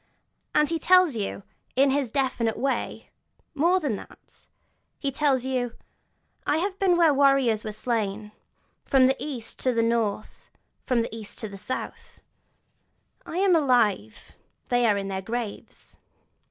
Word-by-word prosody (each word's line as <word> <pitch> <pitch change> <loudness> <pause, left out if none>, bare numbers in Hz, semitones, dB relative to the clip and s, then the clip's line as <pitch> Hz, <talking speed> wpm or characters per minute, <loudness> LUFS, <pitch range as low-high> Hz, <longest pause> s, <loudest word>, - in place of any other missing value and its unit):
And 300 0 +4
he 330 -1 -1
tells 365 -5 +5
you, 200 -2 -4 0.3
in 270 +1 +4
his 275 -3 0
definite 235 -3 -1
way, 275 0 -3 0.4
more 340 +5 +3
than 275 - -2
that; - - -15 0.5
he 280 - -2
tells 270 -2 +1
you: 250 -2 -1 0.7
'I 295 - +2
have 380 +3 -2
been 370 -3 +3
where 335 -2 +5
the - - +3
warriors 275 -6 +3
were 215 - -4
slain, 215 -2 -3 0.5
from 265 -1 +4
the 265 +1 +3
East 255 -7 -6
to 255 - +1
the 230 -1 +2
North, 225 -3 -2
and - - -42
from 250 -3 +2
the 225 - -6
East 220 -2 -9
to 220 - -3
the 200 - -9
South: 210 +6 -6 1.1
I 335 - -5
am 380 -2 +4
alive, 235 - +1 0.4
they 245 -1 +3
are 205 -2 +3
in 195 -1 -3
their 190 -1 -3
graves!' 225 +1 -6
255 Hz, 155 wpm, -25 LUFS, 220-290 Hz, 1.1 s, tells